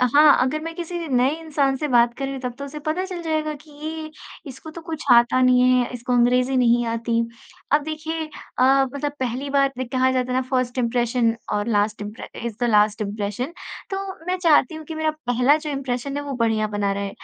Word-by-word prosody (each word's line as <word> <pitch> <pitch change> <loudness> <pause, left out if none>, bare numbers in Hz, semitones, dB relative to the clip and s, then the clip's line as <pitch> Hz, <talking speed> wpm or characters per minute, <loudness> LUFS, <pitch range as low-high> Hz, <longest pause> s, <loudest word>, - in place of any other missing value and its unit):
हाँ, 300 -1 +7
अगर 265 +4 0
मैं 330 0 -5
किसी 345 0 -5
नए 260 +2 +2
इंसान 285 -4 0
से 300 - -2
बात 240 -2 +4
कर 275 - -4
रही 270 - -4
हूँ, 265 - -6
तब 250 -2 -3
तो 280 - -4
उसे 300 +2 -8
पता 315 +5 -2
चल 365 -2 -6
जाएगा 310 -2 -1
कि 305 - -19
ये 310 +2 -6 0.4
इसको 265 +4 -10
तो 335 - -9
कुछ 325 -2 -6
आता 240 +2 +5
नहीं 250 0 +5 0.2
है, - - -4
इसको 245 +1 -3
अंग्रेज़ी 250 +2 +3
नहीं 240 -1 +3
आती। 230 0 -1 0.5
अब 295 +1 +4
देखिए 315 +1 -4 0.3
अ, - - +5 0.3
मतलब 285 +1 -2
पहली 260 +2 -2
बार 275 -1 +3
दे 255 - -1
कहा 260 +1 +1
जाता 255 -1 -1
है 250 - +1
ना 260 - +2
फर्स्ट 255 -1 0
इंप्रेशन 240 -1 +1 0.2
और 205 +1 -1
लास्ट 210 -1 +1
इम्प्रे 210 +1 -7 0.2
इस 230 -2 -4
द - - +2
लास्ट 210 0 +3
इंप्रेशन। 210 - -3 0.4
तो 385 - -2 0.3
मैं 365 - 0
चाहती 315 -2 +4
हूँ 315 - -9
कि 320 - -7
मेरा 315 0 0 0.2
पहला 250 +4 +4
जो 305 -1 -6
इम्प्रेशन 275 0 -3
है, 290 - -3
वो 280 - -5
बढ़िया 225 -2 +1
बना 205 -1 -1
रहे। 200 0 -3
260 Hz, 220 wpm, -22 LUFS, 235-305 Hz, 0.5 s, हाँ